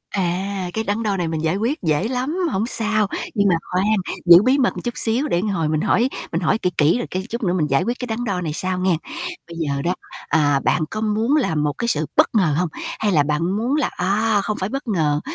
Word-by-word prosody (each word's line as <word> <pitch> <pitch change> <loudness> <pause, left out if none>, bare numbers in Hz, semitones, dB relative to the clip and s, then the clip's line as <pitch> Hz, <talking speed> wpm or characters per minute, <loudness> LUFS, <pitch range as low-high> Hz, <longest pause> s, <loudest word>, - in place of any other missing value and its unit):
À, 190 0 -1
cái 220 - -1
đắn 220 +2 -1
đo 205 -2 0
này 175 -2 -1
mình 160 -1 -3
giải 160 +3 +1
quyết 240 +8 -1
dễ 160 +4 +1
lắm, 260 +7 -2
hổng 195 +3 0
sao, 215 -3 0 0.3
nhưng 200 -1 +3
mà 175 - +4 0.2
khoan, 185 +2 +1 0.4
giữ 170 0 +9
bí 255 +4 +3
mật 260 -3 +1
một - - -5
chút 240 - -2
xíu 240 +6 0
để 170 - +1
hồi 190 -6 -1
mình 155 -1 0
hỏi 245 +3 +2 0.2
mình 165 - -1
hỏi 175 - +2
kỹ 180 - 0
kỹ 155 +7 +4
rồi, 245 - -3
cái, 185 +1 -2
chút 235 +1 -4
nữa 180 -2 +1
mình 160 -5 +1
giải 135 +5 +2
quyết 240 +5 -2
cái 250 - -4
đắn 230 +1 -3
đo 195 -5 -1
này 155 -4 -3
sau 185 +2 -2
nghe. 185 -3 +2 0.5
Bây 170 - -9
giờ 140 -4 -1
đó, 175 +5 0 0.3
à, 145 -3 +3
bạn - - +2
có 215 - -3
muốn 220 +6 +1
là 250 - +1
một 150 -1 0
cái 235 - -2
sự 155 -9 +1
bất - - +5
ngờ 175 -9 +3
hông? 180 -2 0 0.3
Hay 210 -2 +1
là 150 -4 +4
bạn 155 +5 0
muốn 240 +6 0
là, 305 - +1
à, 205 +3 +1
không 215 -2 -2
phải 190 +2 -2
bất 275 +1 -5
ngờ 155 -8 +1
190 Hz, 260 wpm, -21 LUFS, 165-225 Hz, 0.5 s, giữ